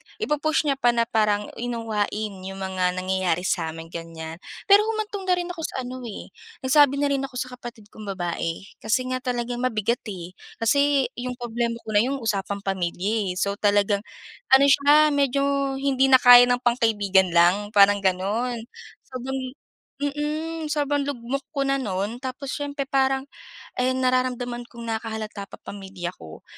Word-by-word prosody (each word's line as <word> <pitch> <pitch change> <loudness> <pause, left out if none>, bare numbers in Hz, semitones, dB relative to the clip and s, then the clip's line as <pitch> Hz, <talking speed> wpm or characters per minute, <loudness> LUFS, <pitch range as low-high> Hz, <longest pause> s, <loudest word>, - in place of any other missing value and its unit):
i-pu-push 310 -7 0
niya 280 -3 0
pa 240 -1 +3
na 235 - +3
parang, 210 -2 +1
unawain 220 -3 -2
'yong 190 +1 -7
mga 185 -1 -1
nangyayari 185 -2 0
sa 185 - 0
amin 165 0 -10
ganyan. 165 -1 -7 0.2
Pero 410 +1 +6
humantong 425 -3 -3
na 365 - +4
rin 355 0 -3
ako 350 - -9
sa 260 - -4
ano 255 +1 -6 0.6
nagsabi 280 +1 +5
na 285 - +2
rin 275 - +1
ako 260 - -12
sa 255 +1 -3
kapatid 235 -4 -11
kong 215 -1 -10
babae, 170 -1 -3 0.2
kasi 230 +4 0
nga 255 - -1
talagang 245 -1 -3
mabigat 235 -2 0
eh 180 -4 -7 0.2
kasi 280 +2 +2
'yong 250 0 -4
problema 235 -1 -2
ko - - -10
na 205 - +4
'yong 270 +3 -1
usapang 200 -2 -2
pamilya. 190 +1 -1
So 200 +2 -1
talagang 205 0 +2 0.6
ano 275 +1 +6
siya 295 +2 +5
medyo 280 -1 +1 0.3
hindi 270 -1 +2
na 265 - +7
kaya 245 0 +9
ng 245 0 0
pangkaibigan 205 -6 +2
lang 190 +5 +3
parang 200 0 +6
gano'n. 205 +6 -1 0.5
Sobrang 260 +1 -4 0.6
mhm, 300 +3 -3
sobrang 290 -1 0
lugmok 275 0 -3
ko 275 - +1
na 275 0 +1
no'n 205 0 -3
tapos 260 +1 -5
siyempre 285 -1 -3
parang 270 0 +1 0.6
nararamdaman 255 -1 0
kong 235 -1 -11
nakahalata 220 -2 -4
pa - - -11
pamilya 190 -3 -6
ko, 80 -1 -12
240 Hz, 155 wpm, -24 LUFS, 200-270 Hz, 0.6 s, kaya